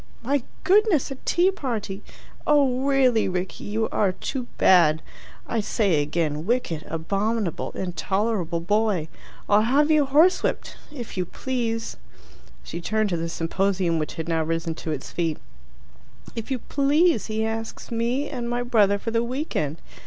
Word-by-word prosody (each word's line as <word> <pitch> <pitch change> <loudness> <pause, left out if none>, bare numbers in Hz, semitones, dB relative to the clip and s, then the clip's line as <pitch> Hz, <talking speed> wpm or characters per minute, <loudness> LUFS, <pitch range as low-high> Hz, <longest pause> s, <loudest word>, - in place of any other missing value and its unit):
"My 275 +3 +1 0.2
goodness, 385 - +3
a - - -3
tea 355 +2 +3
party! 225 - -4 0.5
Oh 275 -4 +3
really, 255 -7 +3
Rickie, 185 0 -4
you 220 +2 -1
are 195 -3 +1
too 250 +5 -4
bad! 160 -4 +5 0.4
I 230 - -1
say 200 -7 +1
again: 150 +1 -2
wicked, 230 -10 0
abominable, 195 +4 -1
intolerable 185 -1 -1
boy! 205 -3 +1 0.4
I'll 205 +1 +5
have 280 +7 +3
you 300 -3 +4
horsewhipped. 320 +7 +3 0.2
If 245 -9 -8
you 180 - 0
please" 230 -1 -3 0.7
she 170 - -6
turned 215 +3 0
to 175 - 0
the 165 0 -3
symposium, 175 0 0
which 155 - -4
had 160 - -4
now 165 -1 +1
risen 165 +1 -2
to 160 - -7
its 145 -3 -5
feet 165 -3 -1 1.0
"If 225 +1 -5
you 265 - 0
please, 285 - +2
he 220 0 -1
asks 225 +1 -5
me 240 +5 0
and 245 -4 -4
my 240 0 -1
brother 210 -5 +3
for 225 +3 -4
the 230 +1 +1
week 260 +6 -4
end. 150 +2 -1
220 Hz, 150 wpm, -24 LUFS, 175-255 Hz, 1.0 s, bad